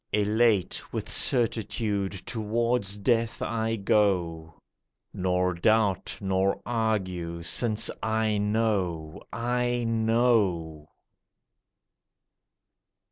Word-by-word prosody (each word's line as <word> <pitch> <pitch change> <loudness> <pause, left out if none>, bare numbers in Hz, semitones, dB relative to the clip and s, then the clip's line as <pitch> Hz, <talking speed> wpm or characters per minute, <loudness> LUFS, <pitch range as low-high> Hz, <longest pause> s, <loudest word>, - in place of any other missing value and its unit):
Elate 105 -2 +1
with - - -4
certitude 110 -4 0
towards 110 -2 -1
death 115 +2 +1
I 115 -1 -1
go, 90 -6 0 0.6
Nor 90 0 0
doubt, 105 +1 +1
nor 95 0 0
argue, 95 -8 -2
since 110 +6 0
I 110 -1 0
know, 100 -7 -1
I 120 +1 -1
know! 110 -9 +1
105 Hz, 75 wpm, -27 LUFS, 90-115 Hz, 0.6 s, Elate